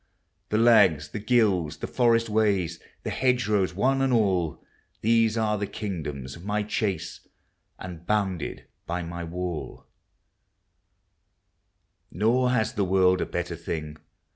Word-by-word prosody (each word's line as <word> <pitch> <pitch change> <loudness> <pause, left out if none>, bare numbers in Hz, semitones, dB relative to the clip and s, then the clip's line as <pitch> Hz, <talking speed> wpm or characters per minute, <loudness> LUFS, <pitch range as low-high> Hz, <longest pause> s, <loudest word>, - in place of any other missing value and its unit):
The 105 - +1
lags, 100 - +5
the 105 - -5
gills, 105 -8 +2
the - - -5
forest 115 -2 +2
ways, 100 -6 +1 0.2
The - - -3
hedgerows 110 -8 +1
one 135 +7 +2
and 135 -1 +2
all. 95 -9 +1 0.4
These 115 0 +3
are 105 -2 +1
the 100 - -2
kingdoms 75 - -5
of 85 - -12
my 105 +1 -1
chase, 105 -2 -3 0.5
And 85 -2 -8
bounded 95 -6 -1 0.2
by 85 +1 -2
my 85 +1 -6
wall; 85 -1 -5 2.3
Nor 120 +6 +2
has 115 -4 +1
the 100 - 0
world 95 -1 +3
a - - -1
better 85 -1 -3
thing. 80 -2 -5
100 Hz, 130 wpm, -26 LUFS, 85-110 Hz, 2.3 s, lags